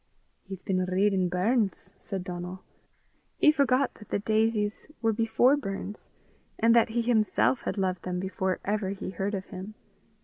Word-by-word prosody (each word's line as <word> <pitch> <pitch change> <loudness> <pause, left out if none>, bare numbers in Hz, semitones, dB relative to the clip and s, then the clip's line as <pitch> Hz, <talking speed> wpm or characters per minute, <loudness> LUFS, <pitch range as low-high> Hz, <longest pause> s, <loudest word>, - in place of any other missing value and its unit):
"He's 190 -2 -8
been 185 -1 0
readin' 185 0 +2
Burns!" 200 +4 0
said 190 -2 -4
Donal. 180 +1 -6 0.7
He 305 - +6
forgot 275 -3 +2
that 210 - -15
the - - +1
daisies 215 0 0
were 225 -1 +1
before 230 +5 +3
Burns, 205 -5 -5 0.5
and 230 +1 +4
that 235 - +5
he 235 +1 0
himself 230 +2 +2
had - - -2
loved 185 -2 0
them 180 -1 -3
before 190 0 -2
ever 205 -1 0
he 195 -1 -5
heard 195 +3 -2
of 190 -1 -4
him. 195 +1 -8
205 Hz, 160 wpm, -28 LUFS, 185-225 Hz, 0.7 s, He